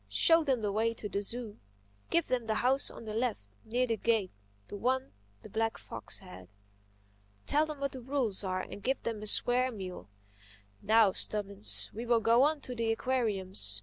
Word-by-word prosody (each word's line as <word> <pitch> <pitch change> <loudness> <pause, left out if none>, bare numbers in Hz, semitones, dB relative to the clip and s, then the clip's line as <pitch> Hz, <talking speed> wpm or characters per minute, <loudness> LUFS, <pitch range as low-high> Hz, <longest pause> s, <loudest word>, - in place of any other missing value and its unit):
"Show 330 0 +5
them 265 -5 0
the 205 - 0
way 225 +3 0
to 210 - -5
the 200 0 -2
zoo. 225 0 -4 0.5
Give 335 -1 +2
them 245 -3 -1
the 220 - 0
house 260 +4 +2
on - - -11
the 215 - -5
left, 225 - -2
near 245 +3 0
the 230 -2 -1
gate—the 140 - -3
one 260 +5 -1 0.3
the - - -9
black 225 0 -1
fox - - -8
had. 90 0 -12 1.0
Tell 305 +2 +2
them 305 -2 -6
what 280 -1 -2
the 260 - -7
rules 245 -6 -1
are 185 -1 -1
and 205 - -9
give 265 +4 -1
them 225 -2 -3
a 215 - -2
square 250 +4 +3
meal—Now, 105 - -2
Stubbins, 205 +1 +1
we 230 +3 -6
will 235 -1 +4
go 230 +2 +4
on 295 +1 +2
to 255 - -5
the 230 -2 0
aquariums. 195 - +1
225 Hz, 180 wpm, -31 LUFS, 195-250 Hz, 1.0 s, Show